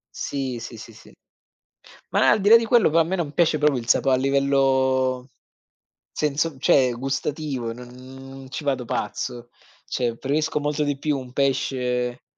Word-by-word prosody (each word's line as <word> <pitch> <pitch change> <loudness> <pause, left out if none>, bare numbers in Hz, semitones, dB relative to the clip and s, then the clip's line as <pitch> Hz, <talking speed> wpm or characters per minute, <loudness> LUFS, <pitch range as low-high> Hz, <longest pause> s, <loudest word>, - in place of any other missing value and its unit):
Sì, 130 -4 -4
sì, 115 0 -9
sì, 110 +1 -11
sì. 110 - -17 1.0
Ma - - +3
al - - +5
di 205 - +3
là 230 - +10
di 230 - -3
quello 230 -7 +4
però 165 - +3
a 165 - +4
me 185 +4 -2
non 155 -5 -3
piace 160 0 +2
proprio 150 -3 +2
il 115 - -11
sapo 135 - +3
a 130 - +4
livello 130 -1 +1 0.8
senso 150 0 -1
cioè 130 -2 +3
gustativo, 135 -1 -3
non 130 +2 -11
ci - - -5
vado 135 -3 -1
pazzo. 120 +2 -4 0.4
Cioè, 120 -2 -2
preferisco 150 +2 -1
molto 150 +1 -1
di 145 -1 -2
più 150 -1 -1
un 125 -1 -9
pesce 125 -2 -1
135 Hz, 165 wpm, -23 LUFS, 125-150 Hz, 1.0 s, là